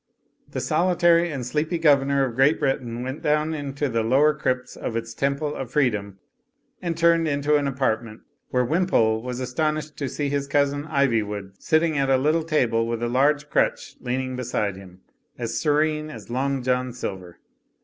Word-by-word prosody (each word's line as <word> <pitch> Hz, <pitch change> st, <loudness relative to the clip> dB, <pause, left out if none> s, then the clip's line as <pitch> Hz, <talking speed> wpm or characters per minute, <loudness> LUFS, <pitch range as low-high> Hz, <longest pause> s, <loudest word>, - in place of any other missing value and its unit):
The -, -, -4 dB
solitary 175 Hz, -1 st, +3 dB
and 135 Hz, -4 st, -4 dB
sleepy 155 Hz, +7 st, -1 dB
governor 140 Hz, -3 st, +3 dB
of 125 Hz, -, -4 dB
Great 135 Hz, +6 st, +3 dB
Britain 125 Hz, -4 st, -1 dB
went 130 Hz, +3 st, -5 dB
down 150 Hz, +1 st, +1 dB
into 145 Hz, -1 st, -3 dB
the 115 Hz, -3 st, 0 dB
lower 135 Hz, +7 st, +4 dB
crypts 125 Hz, -4 st, -2 dB
of 115 Hz, -, -5 dB
its 115 Hz, 0 st, -4 dB
temple 140 Hz, +2 st, -1 dB
of 135 Hz, -4 st, -5 dB
free 135 Hz, -1 st, +3 dB
dom 100 Hz, -2 st, -6 dB, 0.6 s
and 170 Hz, -2 st, -3 dB
turned 170 Hz, -1 st, +3 dB
into 145 Hz, 0 st, +1 dB
an 145 Hz, -1 st, -1 dB
apartment 115 Hz, -5 st, -2 dB, 0.3 s
where 125 Hz, -1 st, +1 dB
Wimpole 120 Hz, -8 st, +2 dB
was 125 Hz, +1 st, -5 dB
astonished 150 Hz, +4 st, -2 dB
to 140 Hz, -3 st, -3 dB
see 145 Hz, +2 st, -2 dB
his 140 Hz, 0 st, -1 dB
cousin 145 Hz, +1 st, +1 dB
Ivywood 110 Hz, -9 st, 0 dB
sitting 160 Hz, -2 st, +1 dB
at 135 Hz, -1 st, +1 dB
a 135 Hz, -, +5 dB
little 155 Hz, +5 st, +2 dB
table 120 Hz, -8 st, +1 dB
with 115 Hz, 0 st, -3 dB
a -, -, +1 dB
large 140 Hz, +4 st, +2 dB
crutch -, -, 0 dB
leaning 130 Hz, +1 st, -3 dB
beside 115 Hz, -5 st, -2 dB
him, 95 Hz, -1 st, -13 dB, 0.4 s
as 115 Hz, -1 st, -3 dB
serene 155 Hz, 0 st, +1 dB
as 115 Hz, -5 st, -10 dB
Long 135 Hz, +1 st, -1 dB
John 125 Hz, 0 st, 0 dB
Silver. 95 Hz, -7 st, -6 dB
135 Hz, 175 wpm, -24 LUFS, 120-150 Hz, 0.6 s, a